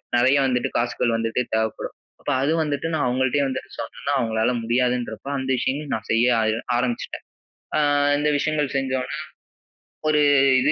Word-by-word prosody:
நெறைய 130 Hz, +4 st, +4 dB
வந்துட்டு 125 Hz, -2 st, 0 dB
காசுகள் 120 Hz, 0 st, 0 dB
வந்துட்டு 115 Hz, +2 st, 0 dB
தேவைப்படும். 110 Hz, 0 st, -1 dB, 0.3 s
அப்ப -, -, -3 dB
அது 140 Hz, +3 st, +1 dB
வந்துட்டு 150 Hz, +1 st, -2 dB
நான் 155 Hz, -4 st, +1 dB
அவங்கள்ட்டேயே 130 Hz, +3 st, +1 dB
வந்துட்டு 130 Hz, -1 st, -5 dB
சொன்னேனா 115 Hz, +4 st, -4 dB
அவங்களால 115 Hz, 0 st, +1 dB
முடியாதுன்றப்போ 125 Hz, 0 st, -1 dB
அந்த 130 Hz, 0 st, -4 dB
விஷயங்கள 140 Hz, +5 st, -1 dB
நான் 110 Hz, -, -7 dB
செய்ய 115 Hz, +2 st, +4 dB, 0.2 s
ஆய 110 Hz, 0 st, +1 dB, 0.2 s
ஆரம்பிச்சுட்டேன். 120 Hz, -1 st, -2 dB, 0.5 s
அ -, -, +3 dB, 0.4 s
இந்த 150 Hz, +1 st, +1 dB
விஷயங்கள் 150 Hz, -2 st, -1 dB
செஞ்ச 135 Hz, -1 st, -1 dB
உடனே 140 Hz, +4 st, -5 dB, 0.9 s
ஒரு 150 Hz, -1 st, +3 dB, 0.4 s
இது 145 Hz, -, +3 dB
125 Hz, 150 wpm, -23 LUFS, 115-140 Hz, 0.9 s, நெறைய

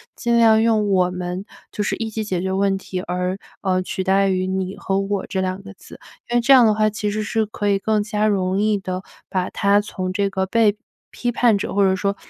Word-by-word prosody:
尽 235 Hz, 0 st, +1 dB
量 220 Hz, -1 st, +5 dB
用 220 Hz, -2 st, +2 dB
“我 180 Hz, -2 st, +2 dB
们” 180 Hz, +1 st, -4 dB, 0.3 s
就 210 Hz, -, -3 dB
是 -, -, -1 dB
一 225 Hz, -1 st, -3 dB
起 220 Hz, 0 st, -3 dB
解 190 Hz, -4 st, -2 dB
决 190 Hz, +1 st, -2 dB
问 195 Hz, 0 st, +1 dB
题， 185 Hz, -1 st, -5 dB
而， 180 Hz, +1 st, -2 dB, 0.2 s
呃， 185 Hz, -2 st, +1 dB
取 185 Hz, 0 st, -4 dB
代 195 Hz, +1 st, +3 dB
于 185 Hz, 0 st, 0 dB
“你” 190 Hz, 0 st, -3 dB
和 195 Hz, -, -1 dB
“我” 195 Hz, -1 st, -2 dB
这 190 Hz, -, -2 dB
2 185 Hz, +1 st, -3 dB
个 200 Hz, +1 st, -11 dB
字。 -, -, -15 dB, 0.3 s
因 240 Hz, -, +2 dB
为 -, -, +3 dB
这 240 Hz, +4 st, +5 dB
样 255 Hz, -3 st, +7 dB
的 215 Hz, -, +4 dB
话 215 Hz, 0 st, +2 dB
其 210 Hz, -1 st, -3 dB
实 215 Hz, -, -2 dB
是 220 Hz, +1 st, 0 dB
可 205 Hz, -1 st, -4 dB
以 200 Hz, -1 st, +3 dB
更 215 Hz, +1 st, +1 dB
加 210 Hz, 0 st, 0 dB
容 190 Hz, -2 st, 0 dB
易 215 Hz, -1 st, +2 dB
地 185 Hz, -1 st, -5 dB, 0.3 s
把 185 Hz, -2 st, -1 dB
她 200 Hz, +1 st, +2 dB
从 185 Hz, -3 st, -4 dB
这 200 Hz, +1 st, 0 dB
个 190 Hz, -1 st, -1 dB
被 210 Hz, +1 st, +2 dB, 0.3 s
批 245 Hz, -, -2 dB
判 240 Hz, -3 st, +3 dB
者， 195 Hz, -, -4 dB
或 200 Hz, -, +3 dB
者 190 Hz, -, +2 dB
说 200 Hz, +1 st, -1 dB
200 Hz, 255 characters per minute, -21 LUFS, 190-215 Hz, 0.3 s, 样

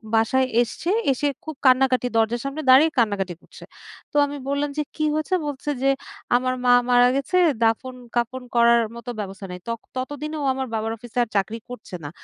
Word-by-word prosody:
বাসায় 240 Hz, +4 st, +3 dB, 0.2 s
এসছে। 245 Hz, +8 st, -3 dB, 0.2 s
এসে 270 Hz, +2 st, 0 dB, 0.2 s
খুব 315 Hz, -1 st, -6 dB
কান্নাকাটি 255 Hz, -1 st, +4 dB
দরজার 225 Hz, +1 st, +1 dB
সামনে 275 Hz, +3 st, -3 dB
দাঁড়িয়ে 285 Hz, +5 st, +7 dB
কান্নাকাটি 200 Hz, -6 st, +1 dB
করছে। -, -, -15 dB, 0.5 s
তো -, -, -23 dB
আমি 285 Hz, 0 st, -6 dB
বললাম 285 Hz, +1 st, 0 dB
যে, 300 Hz, -, +1 dB
"কী 310 Hz, -, 0 dB
হয়েছে?" 310 Hz, +4 st, -2 dB
বলছে 290 Hz, 0 st, -5 dB
যে, 275 Hz, -, +4 dB, 0.5 s
"আমার 255 Hz, +1 st, +1 dB
মা 245 Hz, -, +6 dB, 0.2 s
মারা 245 Hz, 0 st, +6 dB
গেছে 275 Hz, +6 st, 0 dB, 0.3 s
দাফন-কাফন 245 Hz, +1 st, -1 dB
করার 235 Hz, 0 st, +6 dB, 0.2 s
মতো 235 Hz, +1 st, -8 dB
ব্যবস্থা 195 Hz, -1 st, -6 dB
নেই।" 180 Hz, -, -7 dB
ত -, -, -4 dB, 0.3 s
ততদিনে 290 Hz, +4 st, -4 dB
ও -, -, -1 dB
আমার 265 Hz, 0 st, -3 dB
বাবার 220 Hz, 0 st, -1 dB
অফিসে 240 Hz, +2 st, -12 dB
আর 235 Hz, -, -6 dB
চাকরি 200 Hz, +3 st, 0 dB
করছে 245 Hz, -6 st, -8 dB
না। 145 Hz, -, -5 dB
250 Hz, 180 wpm, -23 LUFS, 225-275 Hz, 0.5 s, দাঁড়িয়ে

